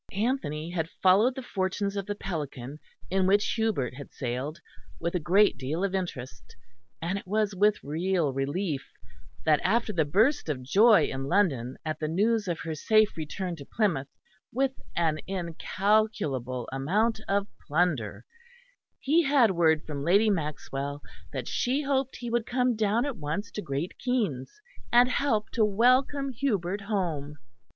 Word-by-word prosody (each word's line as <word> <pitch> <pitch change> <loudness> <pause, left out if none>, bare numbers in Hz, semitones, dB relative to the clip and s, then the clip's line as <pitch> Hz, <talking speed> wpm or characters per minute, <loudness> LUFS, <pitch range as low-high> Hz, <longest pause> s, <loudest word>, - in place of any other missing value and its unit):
Anthony 195 - -1
had 165 -2 -2
followed 205 +10 +3
the 265 - -6
fortunes 200 -1 -2
of 200 -1 -3
the 205 - -2
Pelican, 150 -7 -5 0.3
in 190 0 +2
which 205 +2 +3
Hubert 215 - 0
had 140 +2 -10
sailed, 130 +5 -4 0.4
with 170 +1 -2
a 180 - +1
great 185 -1 +3
deal 150 +8 -2
of 195 -1 0
interest: 170 -10 -5 0.5
and 185 +4 -1
it - - -15
was 210 +1 +1
with 205 +2 +2
real 160 0 0
relief 145 +3 -2 0.6
that 155 -2 +4
after 220 +2 +1
the 165 -4 +2
burst 205 - +2
of 130 -4 -2
joy 210 - +6
in 135 0 -4
London 140 - +1
at 155 0 -3
the 155 - -1
news 210 +6 +1
of 170 -3 -2
her 160 -1 -4
safe 215 +7 +3
return 170 +3 -4
to 140 - -9
Plymouth 155 -6 0 0.4
with 265 +2 +1 0.2
an 160 -2 +1
incalculable 175 - -1
amount 210 - 0
of 200 0 +1 0.2
plunder, 155 - 0 0.7
he 310 +5 +3
had 270 - +4
word 160 -3 +3
from 145 -2 -5
Lady 200 +7 +4
Maxwell 145 -4 -3 0.3
that - - -4
she 265 +4 0
hoped 270 -2 0
he 240 - -6
would 235 -2 0
come 250 -1 +1
down 215 +3 +1
at 280 -5 -3
once 170 +6 -4
to 210 - -4
Great 145 +1 -3
Keynes, 225 - -2 0.3
and 245 +1 +6
help 225 -5 0
to 225 - +2
welcome 255 +6 +3
Hubert 205 -7 -1
home. 170 -8 -2
190 Hz, 155 wpm, -28 LUFS, 150-220 Hz, 0.7 s, joy